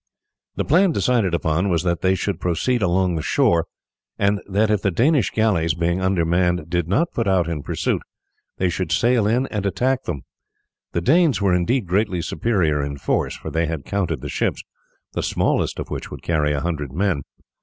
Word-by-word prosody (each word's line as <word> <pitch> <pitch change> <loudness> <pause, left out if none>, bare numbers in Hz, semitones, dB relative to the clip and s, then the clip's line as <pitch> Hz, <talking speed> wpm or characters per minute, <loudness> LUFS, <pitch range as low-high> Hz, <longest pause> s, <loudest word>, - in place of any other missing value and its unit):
The - - -1
plan 180 +5 +4
decided 115 - +1
upon 85 +4 0
was 85 -2 +1
that 85 -2 0
they 95 0 +3
should 95 -2 -2
proceed 110 +8 0
along 90 0 +2
the 80 - -2
shore, 85 +2 +2 0.5
and 100 0 +1
that 105 +3 +2
if 105 -2 +1
the 100 - +1
Danish 125 - +2
galleys, 85 -7 +1
being 85 +2 0
undermanned, 90 -2 +1
did 85 -2 0
not 140 - +1
put 115 -3 -1
out 95 -3 +2
in 80 -3 -3
pursuit, - - -1 0.6
they 95 - +1
should 90 -1 -2
sail 120 -3 +3
in 120 +5 +2
and 105 -3 -3
attack 130 +7 0
them. 75 -6 -3 0.7
The 85 - 0
Danes 155 - +3
were 100 -3 +2
indeed 100 +7 +1
greatly 95 -1 0
superior 85 -11 0
in 70 0 -4
force, - - -1
for - - -7
they 80 0 0
had 80 -4 -4
counted 90 -9 -2
the 70 - -5
ships, - - -1 0.5
the - - -1
smallest - - 0
of - - -6
which - - -5
would - - -9
carry 75 -3 +1
a 70 -1 -1
hundred 75 -5 -3
men. 90 -1 0
90 Hz, 190 wpm, -22 LUFS, 85-105 Hz, 0.7 s, plan